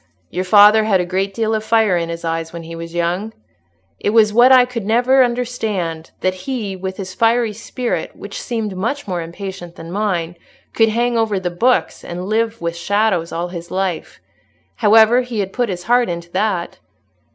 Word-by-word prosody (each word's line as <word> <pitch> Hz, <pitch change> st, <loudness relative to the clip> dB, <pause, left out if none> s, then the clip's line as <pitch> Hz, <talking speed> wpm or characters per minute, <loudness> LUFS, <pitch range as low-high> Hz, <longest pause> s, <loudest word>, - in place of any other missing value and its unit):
Your 185 Hz, -, -2 dB
father 210 Hz, +3 st, +6 dB
had 200 Hz, -4 st, +3 dB
a 180 Hz, -, 0 dB
great 190 Hz, +2 st, -1 dB
deal 220 Hz, +2 st, -1 dB
of 215 Hz, -1 st, -1 dB
fire 220 Hz, -3 st, +3 dB
in 170 Hz, -1 st, -1 dB
his 170 Hz, 0 st, -5 dB
eyes 165 Hz, 0 st, -2 dB
when 170 Hz, -1 st, -8 dB
he 165 Hz, +1 st, -8 dB
was 165 Hz, 0 st, -8 dB
young. 180 Hz, +6 st, -1 dB, 0.7 s
It -, -, 0 dB
was 215 Hz, -1 st, +4 dB
what 240 Hz, +3 st, +6 dB
I 255 Hz, -1 st, +7 dB
could 250 Hz, -3 st, -5 dB
never 245 Hz, +5 st, +4 dB
understand, 220 Hz, -10 st, -2 dB
that 185 Hz, -, +1 dB
he, 205 Hz, 0 st, -4 dB
with 190 Hz, 0 st, -6 dB
his 185 Hz, -2 st, -6 dB
fiery 230 Hz, +2 st, +2 dB
spirit, 240 Hz, +3 st, -4 dB
which -, -, -8 dB
seemed 225 Hz, -, -3 dB
much 230 Hz, +9 st, -3 dB
more 180 Hz, -3 st, -2 dB
impatient 175 Hz, +1 st, -8 dB
than 165 Hz, +1 st, -9 dB
mine, 175 Hz, -4 st, -2 dB, 0.4 s
could 225 Hz, -1 st, +3 dB
hang 235 Hz, +1 st, 0 dB
over 215 Hz, -3 st, 0 dB
the 180 Hz, -1 st, -3 dB
books 175 Hz, -3 st, +1 dB
and 180 Hz, +1 st, -6 dB
live 225 Hz, +2 st, -1 dB
with 170 Hz, 0 st, -3 dB
shadows 185 Hz, -1 st, 0 dB
all 170 Hz, +1 st, -3 dB
his 170 Hz, -1 st, -8 dB
life. 190 Hz, -3 st, -3 dB, 0.6 s
However, 225 Hz, +2 st, +5 dB
he 245 Hz, -2 st, -6 dB
had 195 Hz, -2 st, -2 dB
put 245 Hz, -3 st, 0 dB
his 180 Hz, -2 st, -4 dB
heart 240 Hz, +1 st, +2 dB
into 170 Hz, 0 st, -6 dB
that." 185 Hz, -2 st, -1 dB
200 Hz, 190 wpm, -18 LUFS, 175-225 Hz, 0.7 s, I